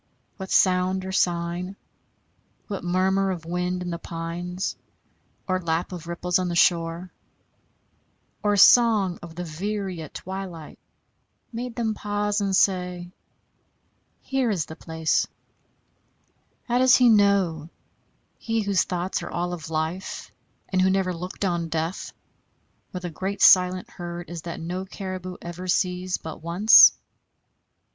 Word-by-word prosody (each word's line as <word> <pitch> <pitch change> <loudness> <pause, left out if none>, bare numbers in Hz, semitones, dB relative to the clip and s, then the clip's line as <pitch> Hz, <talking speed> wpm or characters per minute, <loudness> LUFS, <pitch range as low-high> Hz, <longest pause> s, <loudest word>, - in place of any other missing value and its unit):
What 190 -1 -7
sound 185 0 +2
or 190 - -4
sign, 175 +1 -1 0.9
what 200 -3 -5
murmur 190 +2 +1
of 175 -4 -4
wind 180 +1 -2
in 175 - -4
the 170 - -4
pines, 175 +3 -4 0.7
or 185 -1 0
lap 165 +1 -1
of 170 -2 -8
ripples 180 +1 0
on 180 -1 -1
the 170 - -3
shore, 170 0 +1 1.3
or 205 -1 +1
song 210 -4 +5
of 170 -1 -10
the 180 - -4
veery 185 +2 -4
at 155 - -10
twilight 185 -4 -7 0.7
made 240 +1 -5
them 225 -2 -1
pause 205 0 -1
and 195 -1 0
say, 180 -2 +1 1.1
Here 265 -3 0
is 185 -8 -1
the 160 - -10
place? 160 -1 -1 1.4
How 245 0 0
does 255 0 +6
he 250 - +5
know, 200 -7 +3 0.7
he 225 -1 -1
whose 200 -3 +1
thoughts 180 +1 -2
are - - -6
all 175 +1 -2
of 160 -3 -7
life, 160 +4 -4 0.4
and 185 -1 +1
who 190 - +4
never 190 -1 +1
looked 180 +3 -5
on 170 -3 -1
death, 165 +3 -3 0.8
where 180 - -6
the 175 -2 -5
great 190 +5 -4
silent 185 0 +6
herd 175 0 -8
is 170 -2 -6
that 170 0 -6
no 180 +3 -4
caribou 185 -2 -6
ever 175 +2 -7
sees 180 0 0
but 160 - -9
once? 175 +7 +7
180 Hz, 135 wpm, -24 LUFS, 170-195 Hz, 1.4 s, once